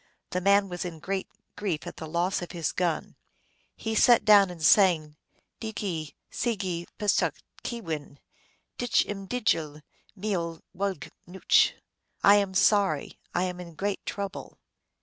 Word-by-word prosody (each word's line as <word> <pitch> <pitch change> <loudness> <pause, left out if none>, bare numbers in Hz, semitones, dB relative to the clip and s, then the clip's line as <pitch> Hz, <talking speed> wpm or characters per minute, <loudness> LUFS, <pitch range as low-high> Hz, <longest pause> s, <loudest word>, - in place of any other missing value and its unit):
The 180 - -1
man 200 +1 +4
was 175 -2 -4
in 175 -3 -6
great 190 +4 -3 0.3
grief 185 -7 -2
at - - -8
the 160 - -6
loss 175 +4 0
of 175 - -7
his 165 -4 -1
gun. 170 -4 -2 0.6
He 220 - -4
sat 235 +2 +5
down 205 -3 +7
and 170 -3 -8
sang: 155 -4 +4 0.2
" - - -47
Nici 190 -9 -4 0.2
sigi 190 -7 -2
psach 210 -1 +1 0.3
ke - - -3
yin, 150 -3 -5 0.6
Dich 245 -1 +2
m 195 -1 -6
djel 165 -11 -1 0.3
mieol 175 -5 -3
wagb 195 -3 -3 0.2
nuch 185 +2 +3 0.3
." - - -39
I 200 - +8
am 195 -2 0
sorry, 195 -7 +2 0.2
I 180 - +2
am 180 -1 -3
hi 180 -1 -8
great 200 +5 -3
trouble. 200 -1 -5
185 Hz, 150 wpm, -27 LUFS, 170-200 Hz, 0.6 s, I